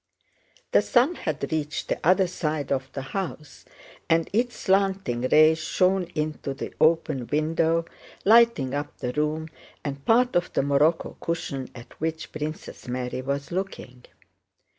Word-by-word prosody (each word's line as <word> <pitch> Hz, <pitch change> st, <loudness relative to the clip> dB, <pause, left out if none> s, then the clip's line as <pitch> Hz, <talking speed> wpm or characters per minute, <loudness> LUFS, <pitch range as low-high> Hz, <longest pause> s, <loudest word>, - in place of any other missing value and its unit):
The -, -, +5 dB
sun 255 Hz, +7 st, +3 dB
had 155 Hz, -, -4 dB
reached 150 Hz, -2 st, -2 dB
the -, -, 0 dB
other 185 Hz, +3 st, +5 dB
side 155 Hz, -5 st, -3 dB
of 130 Hz, -1 st, -1 dB
the 135 Hz, -, -4 dB
house, 155 Hz, -1 st, -6 dB, 0.4 s
and 165 Hz, 0 st, +3 dB
its 240 Hz, +3 st, +1 dB
slanting 190 Hz, -11 st, +1 dB
rays 155 Hz, +1 st, +6 dB
shone 185 Hz, +3 st, +1 dB
into 150 Hz, -3 st, -3 dB
the -, -, -6 dB
open 155 Hz, -6 st, +2 dB
window, 165 Hz, +2 st, +1 dB, 0.4 s
lighting 225 Hz, -, +5 dB
up 145 Hz, +1 st, -4 dB
the 125 Hz, -, -3 dB
room 155 Hz, +2 st, -1 dB, 0.4 s
and 140 Hz, -1 st, -4 dB
part 245 Hz, -, +3 dB
of 175 Hz, 0 st, +1 dB
the -, -, +2 dB
morocco 145 Hz, +4 st, +2 dB
cushion 140 Hz, -6 st, -3 dB
at 120 Hz, +3 st, -13 dB
which 160 Hz, 0 st, -3 dB
Princess 155 Hz, -2 st, -6 dB
Mary 125 Hz, 0 st, -3 dB
was 140 Hz, +3 st, -3 dB
looking. 170 Hz, -9 st, -5 dB
155 Hz, 140 wpm, -25 LUFS, 140-180 Hz, 0.4 s, rays